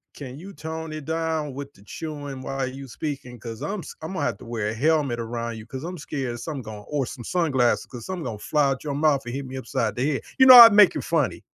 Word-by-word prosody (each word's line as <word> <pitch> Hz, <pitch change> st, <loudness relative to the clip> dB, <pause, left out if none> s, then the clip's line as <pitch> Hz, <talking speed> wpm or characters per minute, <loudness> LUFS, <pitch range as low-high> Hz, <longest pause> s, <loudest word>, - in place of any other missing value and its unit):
can 135 Hz, 0 st, -8 dB
you 195 Hz, +3 st, -10 dB
tone 160 Hz, +1 st, -6 dB
it 155 Hz, -2 st, -7 dB
down 160 Hz, -3 st, -2 dB
with 140 Hz, +1 st, -7 dB
the 100 Hz, -, -20 dB
chewing 145 Hz, +2 st, -7 dB
while 135 Hz, 0 st, -3 dB
you 135 Hz, +1 st, -8 dB
speaking, 135 Hz, -2 st, -6 dB
'cause 115 Hz, 0 st, -8 dB
I'm 200 Hz, -1 st, -3 dB
s -, -, -9 dB
Imma 185 Hz, +4 st, -4 dB
have -, -, -1 dB
to -, -, -12 dB
wear 115 Hz, -3 st, -2 dB
a 110 Hz, -, -3 dB
helmet 145 Hz, -1 st, +1 dB
around 115 Hz, 0 st, -4 dB
you 110 Hz, -, -10 dB
'cause 130 Hz, +3 st, -7 dB
I'm 180 Hz, +2 st, -5 dB
scared 135 Hz, -4 st, -4 dB
of 120 Hz, -, -7 dB
something 145 Hz, -5 st, -5 dB
gon 105 Hz, -2 st, -9 dB
or 145 Hz, -3 st, -1 dB
some 120 Hz, -1 st, -8 dB
sunglasses 140 Hz, -9 st, +1 dB
'cause 120 Hz, -3 st, -10 dB
something 185 Hz, -3 st, -4 dB
gonna 115 Hz, -5 st, -5 dB
fly 150 Hz, +5 st, +1 dB
out 135 Hz, -1 st, -3 dB
your 145 Hz, -2 st, -3 dB
mouth 150 Hz, -2 st, +2 dB
and 120 Hz, +1 st, -5 dB
hit 140 Hz, 0 st, -4 dB
me 130 Hz, +1 st, -7 dB
upside 115 Hz, -3 st, -2 dB
the 125 Hz, -, 0 dB
head." 135 Hz, -, -2 dB, 0.2 s
You 260 Hz, -, +8 dB
know, 255 Hz, -, +12 dB
I'd 230 Hz, -3 st, +12 dB
make 205 Hz, -2 st, +7 dB
it -, -, -3 dB
funny. -, -, 0 dB
140 Hz, 260 wpm, -24 LUFS, 120-160 Hz, 0.2 s, know